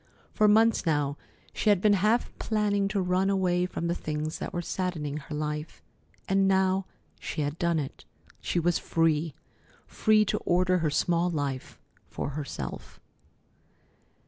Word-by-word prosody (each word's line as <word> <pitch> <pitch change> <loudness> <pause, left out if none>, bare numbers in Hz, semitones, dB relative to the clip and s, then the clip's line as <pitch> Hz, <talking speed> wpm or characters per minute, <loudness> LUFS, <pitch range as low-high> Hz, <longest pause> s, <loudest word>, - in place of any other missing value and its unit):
For 215 - +4
months 225 +2 +4
now 145 -4 0 0.4
she 215 - +1
had 205 -3 +5
been 210 +2 +4
half 210 +5 +1
planning 205 -2 +1
to 200 0 -1
run 185 +1 +1
away 180 -2 +1
from 170 - -4
the 170 - +1
things 155 -1 -4
that - - -4
were 175 - -3
saddening 160 -6 -3
her 150 0 -7
life, 150 +1 -4 0.4
and 195 0 +3
now 190 0 +2 0.3
she 155 - -4
had 145 +2 -3
done 170 -1 +1
it. 140 -3 -5 0.3
She 175 - -1
was 175 +1 +1
free! 160 -2 +1 0.5
Free 215 -1 +3
to - - -1
order 180 +1 +2
her 160 -2 +1
small 170 +3 +1
life 140 -5 -4 0.3
for - - -4
herself. 145 0 -6
175 Hz, 150 wpm, -28 LUFS, 155-195 Hz, 0.5 s, had